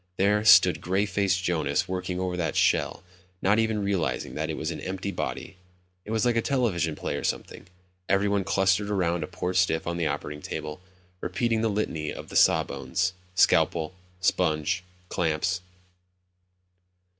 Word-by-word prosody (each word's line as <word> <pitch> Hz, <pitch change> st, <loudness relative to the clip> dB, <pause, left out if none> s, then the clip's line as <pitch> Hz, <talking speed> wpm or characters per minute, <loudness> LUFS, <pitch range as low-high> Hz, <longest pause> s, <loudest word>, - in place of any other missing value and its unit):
There 105 Hz, +2 st, +3 dB
stood 90 Hz, -4 st, +7 dB
gray 95 Hz, +3 st, +1 dB
faced 95 Hz, -3 st, 0 dB
Jonas 85 Hz, -3 st, 0 dB
working 90 Hz, 0 st, -3 dB
over 90 Hz, -1 st, -2 dB
that 85 Hz, -3 st, -2 dB
shell, -, -, +2 dB, 0.4 s
not 100 Hz, +4 st, +3 dB
even 110 Hz, -2 st, 0 dB
realizing 100 Hz, -4 st, -1 dB
that 80 Hz, +1 st, -3 dB
it 80 Hz, -, -3 dB
was 80 Hz, +2 st, -2 dB
an -, -, -6 dB
empty 95 Hz, +1 st, -4 dB
body. 95 Hz, -, -5 dB, 0.5 s
It -, -, -10 dB
was 110 Hz, 0 st, +1 dB
like 120 Hz, -1 st, +2 dB
a 115 Hz, -, +3 dB
television 100 Hz, -, 0 dB
play -, -, -3 dB
or -, -, -5 dB
something; -, -, -4 dB, 0.4 s
everyone 100 Hz, 0 st, +2 dB
clustered 100 Hz, +1 st, +2 dB
around 90 Hz, -4 st, 0 dB
a -, -, -4 dB
poor 90 Hz, 0 st, -3 dB
stiff 90 Hz, -3 st, +2 dB
on 85 Hz, 0 st, -2 dB
the 85 Hz, -2 st, 0 dB
operating 75 Hz, 0 st, -4 dB
table, 75 Hz, +3 st, -6 dB, 0.4 s
repeating 110 Hz, +6 st, 0 dB
the 115 Hz, -, +1 dB
litany 90 Hz, -7 st, -2 dB
of -, -, -8 dB
the -, -, -9 dB
saw -, -, +5 dB
bones. 70 Hz, +7 st, -2 dB, 0.2 s
"Scalpel... 85 Hz, -2 st, +3 dB, 0.3 s
sponge... 85 Hz, 0 st, +1 dB, 0.2 s
clamps 85 Hz, +1 st, 0 dB
90 Hz, 160 wpm, -26 LUFS, 85-100 Hz, 0.5 s, stood